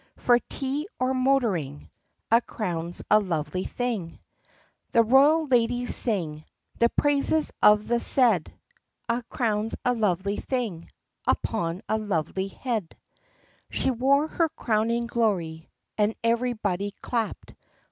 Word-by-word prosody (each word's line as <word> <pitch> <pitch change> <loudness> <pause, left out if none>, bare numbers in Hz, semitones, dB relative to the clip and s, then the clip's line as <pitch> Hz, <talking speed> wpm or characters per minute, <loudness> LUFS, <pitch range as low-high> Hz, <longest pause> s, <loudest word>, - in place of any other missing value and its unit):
For 245 -1 +4
tea 280 +5 -4
or 255 +1 +1
motoring 230 - 0 0.4
A 230 +1 +6
crown's 175 -7 -3
a 215 - +7
lovely 185 -1 -3
thing. 225 -9 -3 0.7
The 230 - +6
royal 285 +7 +5
ladies 245 -2 +1
sing 165 -10 0 0.4
The 235 - +4
praises 290 +3 +2
of 210 0 +5
the 240 0 +1
said. 235 - +3 0.6
A 235 +1 0
crown 220 -2 -1
's - - 0
a 250 - +3
lovely 200 -3 0
thing 225 -11 -3 0.4
Upon 175 -4 -1
a 220 - 0
lovely 190 -2 -2
head! 215 -3 -4 0.7
B - - -5
She - - +1
wore 275 +5 +2
her 330 0 0
crowning 230 -2 0
glory 185 -9 -1 0.3
And 210 +1 +2
everybody 220 -5 0
clapped. 230 -3 -3
225 Hz, 125 wpm, -26 LUFS, 190-250 Hz, 0.7 s, a